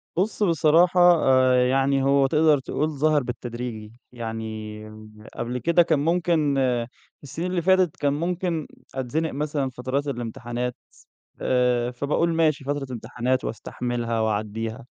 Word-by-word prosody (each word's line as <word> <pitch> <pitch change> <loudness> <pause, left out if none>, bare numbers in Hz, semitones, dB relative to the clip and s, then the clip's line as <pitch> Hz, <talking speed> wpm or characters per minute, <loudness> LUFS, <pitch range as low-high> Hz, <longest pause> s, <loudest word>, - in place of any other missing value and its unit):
بُص 205 +4 0
بصراحة 170 +1 +4 0.2
آآ 130 -1 +4
يعني 135 +1 +2
هو 140 0 +3
تقدر 155 -1 +3
تقول 150 +3 -2
ظَهَر 150 -1 +1
بالتدريجي. 120 -3 -6 0.2
يعني 110 -2 -6 0.5
قبل 125 +1 -3
كده 170 +5 +3
كان 160 -4 +1
ممكن 160 -3 +1 0.7
السِنين 170 +6 -4
اللي 175 -2 0
فاتت 185 -2 +3
كان 145 -1 0
ممكن 170 0 -2 0.3
أتزنق 150 +5 -2
مثلًا 145 -2 -2
فترات 130 +3 -3
الامتحانات، 120 -1 -4 0.7
آآ 125 -1 +1
فباقول 150 +6 0
ماشي 155 -4 +1
فترة 140 -1 -3
امتحانات 120 +2 -2
واستحملها 115 0 -3
وأعدّيها، 110 +3 -3
135 Hz, 120 wpm, -24 LUFS, 120-155 Hz, 0.7 s, بصراحة